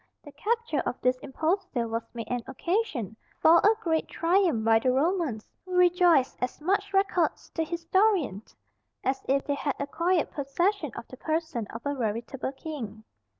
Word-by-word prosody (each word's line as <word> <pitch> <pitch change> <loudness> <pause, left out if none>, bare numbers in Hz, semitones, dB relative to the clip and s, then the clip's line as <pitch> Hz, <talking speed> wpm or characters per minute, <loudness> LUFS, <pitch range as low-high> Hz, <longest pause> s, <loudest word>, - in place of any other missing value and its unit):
The 290 - -11
capture 430 - -1
of - - -3
this 255 0 +1
impostor 315 - -1
was 230 +1 -2
made 230 -1 -5
an 245 -1 -1
occasion 265 - -2 0.2
for 330 +2 +7
a 425 +2 +5
great 320 -2 +1
triumph 335 - +2
by 225 0 +5
the 255 +2 +2
Romans, 285 - 0 0.2
who 370 -1 -5
rejoiced 355 -6 +4
as 250 - -2
much 395 +5 0
records 390 -4 +1
the 325 - 0
historian 340 - +1 0.6
as 265 +1 -1
if 275 +1 +2
they 285 - 0
had 280 -1 -2
acquired 335 +4 0
possession 305 - -1
of 235 - -7
the 255 - -11
person 315 -8 -2
of 225 - -8
a 285 - 0
veritable 240 +2 -3
king. 255 -8 -7
300 Hz, 160 wpm, -28 LUFS, 250-355 Hz, 0.6 s, for